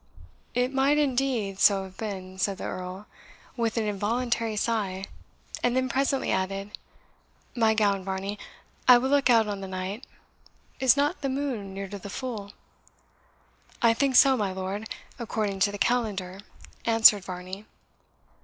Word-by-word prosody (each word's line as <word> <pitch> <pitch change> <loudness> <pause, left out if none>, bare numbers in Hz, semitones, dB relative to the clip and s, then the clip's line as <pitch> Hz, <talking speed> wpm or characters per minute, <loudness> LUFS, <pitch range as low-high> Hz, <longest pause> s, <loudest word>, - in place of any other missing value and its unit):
"It 250 +2 +1
might, 275 +2 +3
indeed, 255 -8 0
so 195 -1 +5
have 190 -1 -11
been" 190 -3 -6
said 195 +1 0
the - - -7
Earl, 185 +2 -6 0.5
with 230 -2 -1
an 225 - +1
involuntary 225 +2 -1
sigh; 205 -4 -1 0.6
and 245 +1 +1
then 260 0 +1
presently 270 0 0
added, 195 +2 -2 0.8
"My 225 -2 +3
gown, 200 -3 +2
Varney; 195 +2 -4 0.5
I 250 -1 +9
will 260 +3 -1
look 285 -2 +3
out 225 -3 +5
on 200 -1 -4
the 195 - -5
night. 190 +5 -5 0.7
Is 260 +1 +5
not 290 +6 +1
the 275 - -1
moon 255 -8 -3
near 195 0 -5
to 200 +1 -7
the 200 - -9
full?" 210 -3 -5 1.3
"I 230 -1 +4
think 270 +2 +1
so, 270 0 +7
my 205 -5 -1
lord, 190 +3 -5 0.3
according 215 -4 -2
to 200 +1 +3
the 205 - -6
calendar," 200 -6 -1 0.4
answered 225 -3 +6
Varney. 185 +3 -7
210 Hz, 150 wpm, -27 LUFS, 195-245 Hz, 1.3 s, I